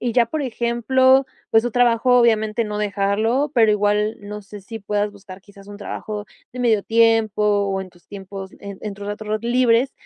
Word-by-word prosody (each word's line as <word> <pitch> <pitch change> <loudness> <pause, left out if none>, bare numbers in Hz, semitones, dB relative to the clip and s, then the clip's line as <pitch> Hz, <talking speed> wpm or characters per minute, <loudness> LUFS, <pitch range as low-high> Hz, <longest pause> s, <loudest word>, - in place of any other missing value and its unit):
y 240 -2 -1
ya, 240 -1 +3
por 300 +5 -3
ejemplo, 260 +2 +2 0.2
pues, 225 +1 +4
tu 245 - -2
trabajo 245 0 +3
obviamente 220 -1 +2
no 210 -1 -4
dejarlo, 210 +7 0
pero 225 -5 +4
igual 210 +1 +1
no 210 0 -8
sé 205 +1 -11
si 225 +3 -8
puedas 205 0 -1
buscar 195 -2 -13
quizás 200 0 -17
un 205 - -10
trabajo 210 0 -6 0.3
de 250 - -6
medio 220 -4 +2
tiempo 225 -2 +2
o 200 -2 +1
en 185 - -8
tus 175 -1 -25
tiempos 195 -1 -9
en 200 -1 -8
en 210 -2 -5
tus 200 +1 -9
ratos 210 +1 -6
ratos 215 +1 -2
libres, 250 +1 +3
215 Hz, 195 wpm, -21 LUFS, 205-235 Hz, 0.3 s, pues